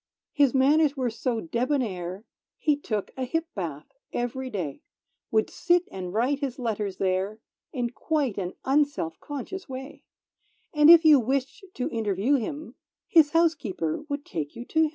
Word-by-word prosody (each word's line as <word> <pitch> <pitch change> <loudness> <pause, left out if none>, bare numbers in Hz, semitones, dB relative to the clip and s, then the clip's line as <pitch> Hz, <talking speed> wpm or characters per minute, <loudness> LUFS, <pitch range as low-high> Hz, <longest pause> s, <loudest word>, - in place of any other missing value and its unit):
His 280 -3 +3
manners 290 +2 +4
were 250 -3 0
so 230 +1 -2
debonnair, 210 - -2 0.3
He 300 -2 +2
took 215 -8 -3
a 260 - -3
hip 325 +6 -1
bath 160 -7 -5 0.3
ev'ry 255 +2 -3
day; 175 - -4 0.5
Would 220 -1 +2
sit 350 0 +2
and 185 -2 -5
write 250 +8 +1
his 275 -4 -3
letters 210 -6 -2
there, 190 +3 -1 0.3
In 245 -4 -2
quite 280 -6 -1
an 180 -1 -3
unselfconscious 290 - -1
way; 265 +2 -8 0.7
And, 300 0 +6
if 335 -1 +9
you 300 -3 +8
wished 265 - -2
to 250 - -2
interview 215 +3 0
him, 290 +6 -5 0.3
His 320 -4 +6
housekeeper 295 - 0
would 285 0 -3
take 150 -3 -5
you 235 +1 -7
to 320 - +1
him. 315 - +3
255 Hz, 155 wpm, -26 LUFS, 205-290 Hz, 0.7 s, if